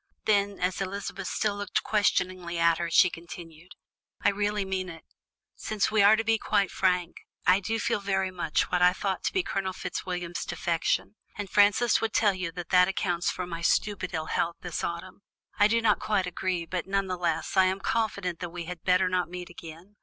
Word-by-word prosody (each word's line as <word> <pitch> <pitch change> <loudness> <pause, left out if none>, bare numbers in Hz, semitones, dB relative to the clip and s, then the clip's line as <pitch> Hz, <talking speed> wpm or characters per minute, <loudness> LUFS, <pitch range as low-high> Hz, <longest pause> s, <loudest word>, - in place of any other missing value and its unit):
Then, 200 -1 +2
as 180 +1 -1
Elizabeth 195 0 -4
still 210 -2 0
looked 205 +2 -1
questioningly 185 -4 0
at 170 0 +3
her, 170 -1 -2
she 175 +1 +5
continued: 170 0 -11 0.5
"I - - +5
really 205 0 -1
mean 190 -1 -3
it. 165 -1 -10 0.5
Since 215 -1 -1
we 215 -1 +4
are 205 +2 +7
to 225 - -1
be 225 0 +2
quite 200 -2 +1
frank, 180 -2 0 0.3
I 185 +2 +5
did 220 +3 -2
feel - - +1
very 195 -1 -1
much 175 -4 -1
what 180 0 +1
I 180 0 +6
thought 190 0 -3
to - - +1
be 380 - 0
Colonel 190 - -2
Fitzwilliam's 180 -2 -4
defection, 170 +4 -1 0.2
and 205 -2 -5
Frances 210 +3 +4
would 225 -1 -1
tell 210 -3 +3
you 185 -2 -4
that 175 -2 -7
that 180 -1 +5
accounts 175 -2 0
for 180 - -3
my 170 -1 -6
stupid 185 +2 +1
ill 160 -1 -2
health 170 +1 -1
this 175 -3 -4
autumn; 170 +3 -5 0.4
I 205 - +7
do 230 +2 +2
not 210 -2 +3
quite 205 -3 0
agree, 180 -1 -2
but 180 +1 -4
none 195 0 0
the 185 -1 -3
less, 170 -1 -2
I 190 -1 +6
am 190 +1 0
confident 200 -5 -1
that 175 - -4
we 170 0 -6
had 180 -1 -7
better 185 0 +3
not 180 -1 0
meet 180 0 -7
again. 170 +4 -12
185 Hz, 205 wpm, -27 LUFS, 175-200 Hz, 0.5 s, are